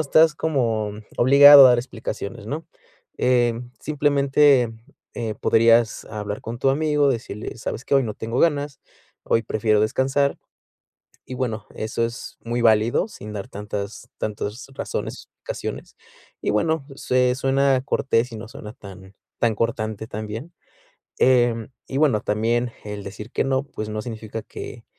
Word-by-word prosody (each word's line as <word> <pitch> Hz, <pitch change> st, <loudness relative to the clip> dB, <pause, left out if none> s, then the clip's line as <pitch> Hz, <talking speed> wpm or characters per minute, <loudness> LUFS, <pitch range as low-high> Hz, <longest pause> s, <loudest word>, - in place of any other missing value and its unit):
estás 155 Hz, +1 st, +4 dB
como, 115 Hz, -9 st, 0 dB, 0.2 s
obligado 140 Hz, +2 st, +9 dB
a 125 Hz, -, +7 dB
dar 120 Hz, -, +4 dB
explicaciones, 110 Hz, -3 st, -6 dB
¿no?, 155 Hz, +6 st, -5 dB, 0.5 s
eh, 120 Hz, -2 st, +3 dB, 0.3 s
simplemente, 140 Hz, -4 st, +3 dB, 0.4 s
eh, 110 Hz, -3 st, -3 dB
podrías 115 Hz, 0 st, +3 dB
hablar 105 Hz, -1 st, -5 dB
con 115 Hz, +1 st, -6 dB
tu 135 Hz, -, +3 dB
amigo, 150 Hz, 0 st, +2 dB
decirle: 115 Hz, -3 st, -5 dB
"¿Sabes 115 Hz, -, -5 dB
qué? -, -, 0 dB
Hoy 135 Hz, -, +5 dB
no 110 Hz, -4 st, -4 dB
tengo 115 Hz, +3 st, -3 dB
ganas, 145 Hz, -3 st, +1 dB, 0.4 s
hoy 115 Hz, -, +1 dB
prefiero 110 Hz, 0 st, +1 dB
descansar". 135 Hz, +6 st, +1 dB, 0.9 s
Y 130 Hz, -, -7 dB
bueno, 115 Hz, -4 st, -3 dB
eso 110 Hz, +1 st, -2 dB
es 115 Hz, +3 st, -9 dB
muy 120 Hz, +1 st, -2 dB
válido, 115 Hz, -, +3 dB
sin 105 Hz, -, -9 dB
dar 100 Hz, -, -5 dB
tantas 105 Hz, +3 st, -6 dB
tantas 105 Hz, +3 st, -4 dB
razones -, -, -5 dB
razones. -, -, -6 dB, 0.4 s
Y -, -, -4 dB
bueno, 140 Hz, +7 st, 0 dB
sue 125 Hz, -1 st, +1 dB
suena 135 Hz, 0 st, +2 dB
cortés 120 Hz, -3 st, 0 dB
y -, -, -6 dB
no 110 Hz, 0 st, -8 dB
suena 110 Hz, -4 st, -9 dB
tan 95 Hz, -3 st, -13 dB, 0.2 s
tan 115 Hz, -2 st, +2 dB
cortante 110 Hz, -1 st, -2 dB
también, 110 Hz, +8 st, -6 dB, 0.7 s
em, 120 Hz, -3 st, +3 dB, 0.2 s
y 135 Hz, -, -3 dB
bueno, 135 Hz, -9 st, +3 dB
también 115 Hz, +3 st, 0 dB
el 105 Hz, -1 st, -6 dB
decir 105 Hz, +3 st, -8 dB
que -, -, 0 dB
no, 135 Hz, 0 st, +1 dB
pues 110 Hz, -6 st, -6 dB
no 110 Hz, 0 st, -3 dB
significa 115 Hz, -2 st, -6 dB
que -, -, -9 dB
120 Hz, 145 wpm, -23 LUFS, 110-135 Hz, 0.9 s, obligado